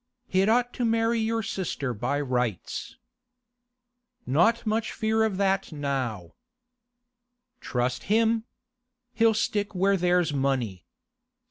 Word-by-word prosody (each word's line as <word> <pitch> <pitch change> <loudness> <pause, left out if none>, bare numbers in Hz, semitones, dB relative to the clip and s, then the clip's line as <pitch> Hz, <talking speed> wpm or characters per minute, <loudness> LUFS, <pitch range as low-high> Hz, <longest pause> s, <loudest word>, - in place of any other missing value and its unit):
He'd 190 -1 +2
ought 245 +2 +2
to 245 - -3
marry 230 0 +2
your 225 0 0
sister 175 - -3
by 140 +6 -1
rights.' 125 - -3 1.3
'Not 180 - +2
much 220 +1 0
fear 220 -1 +1
of 215 -4 0
that 195 -1 +1
now.' 130 - -3 1.3
'Trust 125 0 -2
him! 225 +2 +2 0.7
He'll 225 -1 +3
stick 205 -1 -1
where 195 +2 +3
there's 175 -3 +2
money. 130 -9 -1
195 Hz, 110 wpm, -26 LUFS, 135-225 Hz, 1.3 s, He'll